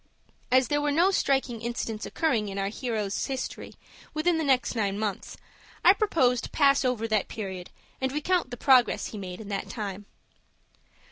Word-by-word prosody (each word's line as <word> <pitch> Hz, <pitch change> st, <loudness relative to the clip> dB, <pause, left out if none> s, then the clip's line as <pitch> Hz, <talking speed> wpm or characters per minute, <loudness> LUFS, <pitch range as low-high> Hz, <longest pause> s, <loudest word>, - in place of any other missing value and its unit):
As 255 Hz, -1 st, +4 dB
there 290 Hz, 0 st, +1 dB
were 295 Hz, 0 st, +1 dB
no 345 Hz, +6 st, +4 dB
striking 265 Hz, -, 0 dB
incidents 230 Hz, -2 st, -4 dB
occurring 235 Hz, -11 st, 0 dB
in 195 Hz, -, -6 dB
our 195 Hz, 0 st, -1 dB
hero's 215 Hz, -3 st, -2 dB
history 265 Hz, -1 st, -5 dB, 0.4 s
within 325 Hz, +2 st, +2 dB
the -, -, 0 dB
next 260 Hz, -4 st, +2 dB
nine 200 Hz, -3 st, 0 dB
months, 210 Hz, -3 st, -4 dB, 0.5 s
I 370 Hz, -, +9 dB
propose 265 Hz, -, +2 dB
to -, -, -7 dB
pass 280 Hz, -2 st, +3 dB
over 245 Hz, -3 st, 0 dB
that 215 Hz, -3 st, +1 dB
period, 190 Hz, -4 st, -6 dB, 0.3 s
and 265 Hz, 0 st, 0 dB
recount 300 Hz, +2 st, 0 dB
the 245 Hz, -, -7 dB
progress 255 Hz, -2 st, +4 dB
he 215 Hz, -, -7 dB
made 180 Hz, -2 st, -7 dB
in 215 Hz, -2 st, -9 dB
that 195 Hz, -1 st, -3 dB
time. 205 Hz, -2 st, -5 dB
245 Hz, 175 wpm, -27 LUFS, 210-280 Hz, 0.5 s, I